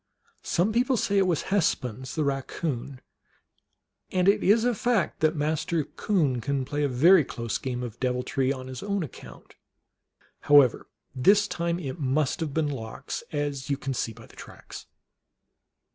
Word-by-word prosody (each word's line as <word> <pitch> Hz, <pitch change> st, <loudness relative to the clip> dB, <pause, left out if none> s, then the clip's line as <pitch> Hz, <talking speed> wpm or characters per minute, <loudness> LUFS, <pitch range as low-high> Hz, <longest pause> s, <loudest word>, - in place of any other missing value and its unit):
Some 190 Hz, +6 st, 0 dB
people 250 Hz, +2 st, +2 dB
say 200 Hz, -2 st, +1 dB
it 190 Hz, -, +3 dB
was 170 Hz, -4 st, 0 dB
Hespuns, 130 Hz, -, -1 dB
the 155 Hz, -, 0 dB
Eaccoon; 135 Hz, -1 st, -3 dB, 1.1 s
and 185 Hz, 0 st, +1 dB
it 200 Hz, -, +4 dB
is 220 Hz, +4 st, +4 dB
a 245 Hz, -, +2 dB
fact 230 Hz, -5 st, 0 dB
that 155 Hz, +1 st, +2 dB
Master 155 Hz, +2 st, 0 dB
Coon 145 Hz, -, 0 dB
can 140 Hz, +1 st, -1 dB
play 145 Hz, +2 st, -2 dB
a 145 Hz, -, +1 dB
very 160 Hz, +8 st, +6 dB
close 115 Hz, -4 st, -4 dB
game 125 Hz, -1 st, -4 dB
of 120 Hz, -4 st, -7 dB
deviltry 130 Hz, +1 st, 0 dB
on 130 Hz, -2 st, -5 dB
his 130 Hz, -1 st, -7 dB
own 200 Hz, -2 st, -1 dB
account. 150 Hz, -, -11 dB, 0.9 s
However, 145 Hz, -4 st, +4 dB, 0.3 s
this 200 Hz, +11 st, +4 dB
time 170 Hz, 0 st, -2 dB
it 160 Hz, -2 st, -6 dB
must 140 Hz, 0 st, 0 dB
have 160 Hz, -3 st, -2 dB
been 155 Hz, +1 st, 0 dB
Lox, 115 Hz, -6 st, -6 dB
as 145 Hz, -2 st, -3 dB
you 140 Hz, -, 0 dB
can 135 Hz, 0 st, -4 dB
see 115 Hz, -, -2 dB
by 115 Hz, +1 st, -13 dB
the -, -, -19 dB
tracks. -, -, -11 dB
145 Hz, 160 wpm, -26 LUFS, 130-180 Hz, 1.1 s, very